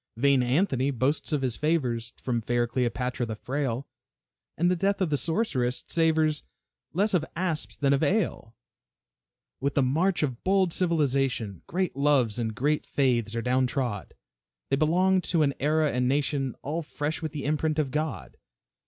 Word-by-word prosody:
Vain 140 +1 +4
Anthony 130 +1 +1
boasts 140 +5 0
of 145 -3 0
his 125 -3 -1
favors 125 -7 0
From 120 -2 -2
fair 120 +1 +1
Cleopatra 125 0 -1
the 110 - -4
frail, 130 +1 -3 0.7
And 175 +2 +3
the - - +2
death 195 +3 0
of 185 -5 0
the - - +3
sorceress 135 - 0
savors 160 -2 +2 0.5
Less 200 +5 +1
of 175 -4 +3
asps 165 -3 -1
than 140 -1 +2
of 140 - +1
ale. 155 - 0 1.0
With 140 +1 -1
the 140 - +4
march 165 +8 +1
of 130 -5 -3
bold 190 -2 +2
civilization, 135 - 0
Great 185 -2 -1
loves 135 -6 +2
and 110 -2 -2
great 150 +5 +1
faiths 120 -5 0
are 115 - -2
down 125 +1 +2
trod, 120 -6 -3 0.5
They 135 - +3
belonged 180 +5 +3
to 165 -3 +2
an 140 -1 +1
era 155 +1 +2
and 125 0 0
nation 135 -1 0
All 155 +4 -2
fresh 155 0 -4
with 160 -2 -3
the 145 -3 -5
imprint 155 +1 0
of 145 -4 0
God. 150 - -3
140 Hz, 165 wpm, -27 LUFS, 125-160 Hz, 1.0 s, Vain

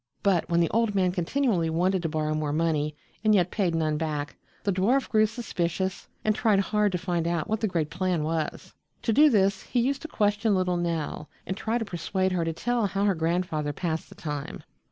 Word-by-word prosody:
But 190 -4 +2
when 170 0 +3
the 170 - +2
old 225 -2 +1
man 185 -2 +3
continually 180 -1 0
wanted 180 +3 +1
to 165 - -1
borrow 155 -1 -1
more 155 -1 -1
money 150 -1 0 0.3
and 215 -1 +5
yet 180 -2 +2
paid 185 -6 0
none 155 -2 +1
back, 150 -3 -3 0.3
the 200 - +1
dwarf 230 +9 +2
grew 215 -1 +4
suspicious 190 -4 -3 0.2
and 215 - +4
tried 210 -2 +3
hard 210 +1 +1
to - - +1
find 175 -2 -1
out 170 -2 -1
what 220 0 0
the 220 - +1
great 165 -5 -1
plan 180 -3 0
was. 160 0 -3 0.3
To 225 - +1
do 300 +6 +7
this 200 -5 +2
he 250 - -1
used 270 +3 0
to 320 - -6
question 210 -5 +1
little 180 -1 +1
Nell 165 -3 -3 0.2
and 190 - -3
try 220 +3 -1
to 230 - -2
persuade 190 +1 -1
her 180 -2 0
to 165 - -1
tell 230 +6 0
how 195 +1 0
her 200 - +3
grandfather 160 -3 -1
passed 160 0 -3
the - - -13
time. 150 -3 -5
180 Hz, 215 wpm, -27 LUFS, 165-210 Hz, 0.3 s, do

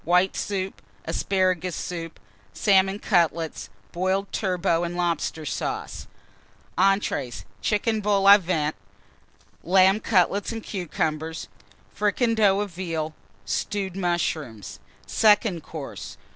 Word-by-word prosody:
White 180 +2 +3
Soup. 195 -1 -3 0.2
Asparagus 185 -2 0
Soup. 165 -2 -5 0.3
Salmon 195 - +3
Cutlets. 170 - 0 0.2
Boiled 190 +2 -1
Turbot 180 -3 0
and 175 0 -3
Lobster 170 -2 -1
Sauce. - - -4 0.7
ENTREES. 190 -10 +1 0.2
Chicken 215 +1 +1
Vol 200 -1 +2
au 200 +1 +11
Vent. 160 -4 -1 0.9
Lamb 190 +3 +5
Cutlets 200 -1 +1
and 225 -1 -5
Cucumbers. 160 -4 -3 0.4
Fricandeau 210 -2 +2
of 205 -2 -4
Veal. 165 -3 -3 0.3
Stewed 195 -3 -2
Mushrooms. 165 - -2 0.3
SECOND 210 -5 +3
COURSE. 150 -2 -8
185 Hz, 100 wpm, -25 LUFS, 165-200 Hz, 0.9 s, au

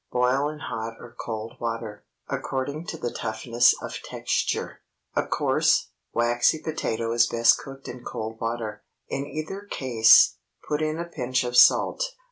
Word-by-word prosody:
Boil 125 +4 +2
in 155 - -7
hot 115 -5 -5
or 120 - -12
cold 110 -1 -5
water, 115 -2 -4 0.2
according 140 +5 -3
to 165 - -4
the 120 -5 -3
toughness 115 +2 +2
of - - -6
texture. - - -2 0.3
A - - 0
coarse, - - +2 0.2
waxy 120 +5 +2
potato 115 -8 -3
is 120 0 +4
best 115 0 +4
cooked 135 0 -10
in 120 0 -8
cold 110 0 -5
water. 115 -2 -3 0.3
In 140 +1 -3
either 155 +7 -5
case, 115 -4 +5 0.3
put 150 0 -1
in 155 0 -1
a 170 - -3
pinch 130 -6 -1
of 125 0 -3
salt. 310 - +5
120 Hz, 150 wpm, -25 LUFS, 115-140 Hz, 0.3 s, case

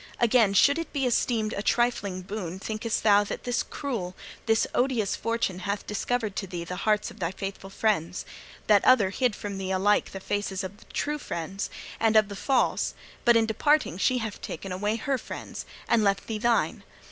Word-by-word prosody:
Again, 230 -4 +4
should 285 +9 +5
it 330 - -5
be 275 -3 0
esteemed 225 -3 +1
a 200 - -2
trifling 205 -6 0
boon, 185 -2 -5
thinkest 215 +3 -2
thou, 205 -1 +6
that - - -5
this 245 -1 0
cruel, 215 -11 -4 0.3
this 225 0 +3
odious 245 -6 +1
Fortune 230 -5 -1
hath 200 +2 -3
discovered 215 0 -1
to 195 - -2
thee 175 -2 -5
the 180 +2 -5
hearts 210 -1 +2
of - - -15
thy 170 -3 0
faithful 195 +1 -6
friends 195 -4 0 0.4
that 205 -2 +5
other 225 -7 +5
hid 245 -1 +1
from 200 -2 -5
thee 190 -1 -3
alike 190 +2 +2
the 195 - -6
faces 200 0 -2
of 190 +2 -6
the - - -18
true 295 +1 -1
friends 190 - -4 0.3
and 225 -1 +3
of 215 -1 +5
the 200 - -6
false, 260 +5 +1 0.3
but 235 -1 +7
in 225 - +3
departing 220 - +2
she 255 +5 +3
hath 220 -4 -4
taken 195 - -6
away 205 +4 0
her 275 +1 -1
friends, - - -7 0.2
and 230 -2 +3
left 200 -1 +1
thee 220 -2 -3
thine? 235 0 +1
210 Hz, 195 wpm, -27 LUFS, 195-235 Hz, 0.4 s, but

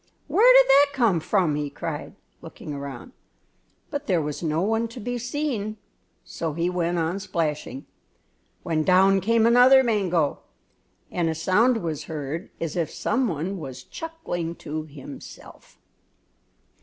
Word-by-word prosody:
"Where 480 +4 +5
did - - +8
that 285 +1 +5
come 230 -10 +3
from?" 175 -2 +1
he 145 0 -2
cried, - - -6 0.3
looking 150 - -9
around; 140 - -7 0.8
but 285 -1 -4
there 180 -4 +2
was 150 -2 -4
no 160 +1 0
one 225 +3 +1
to 230 +2 -10
be 245 +2 -3
seen, 245 -4 -3 0.5
so 160 -2 -4
he 170 +3 -1
went 175 -1 -1
on 170 +3 -1
splashing, 150 -7 -3 0.8
when 160 -3 0
down 190 +2 +4
came 225 +3 +3
another 250 +3 +7
mango, 185 - +1 0.7
and 170 -2 0
a 160 - -2
sound 215 +8 +2
was 155 -2 -3
heard 155 +1 -5
as 165 -3 -3
if 170 -3 -1
some 255 0 0
one 180 +2 -3
was 130 -4 -8
chuckling 175 - -5
to 155 0 -5
himself. 140 -2 -12
180 Hz, 145 wpm, -24 LUFS, 155-230 Hz, 0.8 s, did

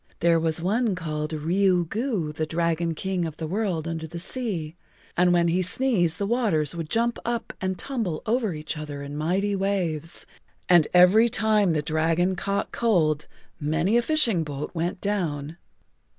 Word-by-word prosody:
"There 170 -1 +4
was 160 0 -1
one 215 +2 +1
called 155 -3 -3
Riu 175 +3 +1
Gu, 205 - -2
the 155 +1 -2
Dragon 165 0 0
King 190 +1 -2
of 160 - -8
the 160 - -4
World 180 -2 -2
Under 160 -1 -4
the 170 +2 -8
Sea, 175 -5 -3 0.4
and 180 0 +4
when 175 -1 +3
he 175 +2 +2
sneezed 185 -4 +1
the 200 - -1
waters 200 - +1
would 165 -2 -5
jump 235 +1 0
up 235 0 -3
and 185 0 -1
tumble 220 - -3
over 220 -5 0
each 150 +1 -4
other 145 -2 -6
in 140 +1 -7
mighty 190 +7 0
waves, 180 -5 -1 0.4
and 175 -3 +5
every 185 +6 +6
time 215 -5 +2
the 150 -1 0
dragon 165 +4 +1
caught 200 +2 -2
cold[Pg 160 -10 +1 0.3
34] 150 -2 -3
many 165 +7 +2
a 240 - +5
fishing 235 - +2
boat 145 -1 -5
went 175 +1 -2
down. 165 -7 -2
175 Hz, 170 wpm, -25 LUFS, 160-205 Hz, 0.4 s, every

